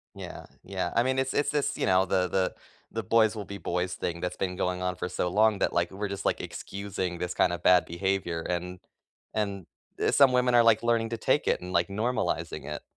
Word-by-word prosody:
Yeah, - - -8 0.2
yeah, 95 -2 -3
I 115 - +5
mean, 130 +1 0
it's 130 0 0
it's 145 - +1
it's, 145 -1 0
you - - 0
know, 95 0 +4
the 95 -1 +1
the 95 +1 0 0.4
the 115 - -2
boys 110 +2 +3
will 105 -2 -5
be 100 - -7
boys 90 +1 -2
thing 85 -1 -3
that's 90 - -3
been 90 -1 -2
going 90 0 -1
on 90 0 -1
for 90 0 -4
so 90 0 -1
long 105 +3 +3
that, - - 0
like, 85 0 +1
we're 100 +2 -4
just, 100 0 -6
like, - - +1
excusing 95 -3 -5
this 90 +1 -3
kind 90 - +3
of 85 0 -5
bad 90 -1 +6
behavior, 85 -1 -1
and 90 +1 -3 0.5
and 100 -4 -2 0.5
some 140 -2 +6
women 125 0 +2
are, 120 -1 +7
like, 115 -1 +4
learning 115 -1 +1
to 115 - -3
take - - +1
it - - +2
and, 90 0 -7
like, 85 -1 +2
normalizing 110 +5 -2
it. 75 - -5
95 Hz, 225 wpm, -28 LUFS, 90-110 Hz, 0.5 s, are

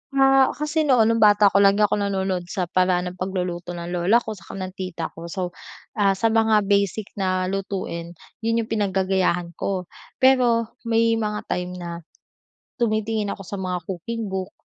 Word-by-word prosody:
Ah, 270 0 +5
kasi 300 +1 -1
noon 250 -4 +5
nung 230 - +1
bata 205 -1 +6
ko 200 - +4
lagi 200 +1 +5
ako 210 0 +2
nanonood 190 -3 -1
sa 185 - -2
paraan 180 0 +1
ng 180 - -16
pagluluto 180 -2 -3
ng 170 0 -6
lola 185 +7 +3
ko - - -5
saka 195 -2 -9
ng 185 -1 -5
tita 185 -3 -5
ko. 165 +1 -9
So, 180 0 -4 0.5
ah, 195 -1 +4
sa 225 +3 +1
mga 220 -2 +3
basic 200 +1 0
na 185 -1 +1
lutuin 185 -3 -4 0.2
yun 230 0 0
yung 220 - -13
pinag 205 -4 0
gagayahan 185 -2 +1
ko. 190 -2 -1 0.3
Pero 245 -4 +3 0.2
may 230 0 +2
mga 210 -1 -2
time 180 0 -2
na, 175 -1 -6 0.9
tumitingin 215 -3 0
ako 195 - -10
sa 200 +2 -6
mga 185 -1 -2
cooking 210 +4 -4
book, 190 0 -4
195 Hz, 175 wpm, -23 LUFS, 180-220 Hz, 0.9 s, bata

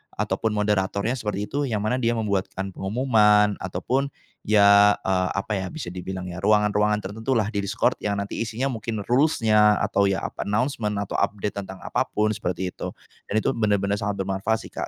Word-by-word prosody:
ataupun 110 -2 -1
moderatornya 100 +1 0
seperti 105 -5 -3
itu, 140 +5 -2
yang 105 -3 -2
mana 125 +4 0
dia 120 -1 +1
membuatkan 100 -3 -2
pengumuman, 105 -1 +3
ataupun, 110 +10 -1 0.4
ya, 100 -1 +6
eee, 95 -1 0
apa 100 +2 -3
ya 95 - -3
bisa 150 - -6
dibilang, 95 +1 -5
ya, 85 - -6
ruangan-ruangan 105 +1 +2
tertentulah, 110 +2 -1
di 100 - -2
Discord, 105 +5 0
yang 100 -1 -1
nanti 100 - -6
isinya 115 +4 -2
mungkin 110 -3 -4
rules-nya 110 -6 +4
atau 100 - +2
ya, 95 0 -1
apa, - - -5
announcement, 105 -1 0
atau - - -3
update 105 0 -1
tentang 95 -1 -9
apapun, 105 0 0
seperti 95 -3 -3
itu. - - -7 0.3
Dan 110 +1 0
itu - - +2
benar-benar 100 -2 0
sangat 100 -2 -2
bermanfaat 95 +4 -1
sih - - -11
Kak, - - -4
105 Hz, 175 wpm, -24 LUFS, 100-110 Hz, 0.4 s, ya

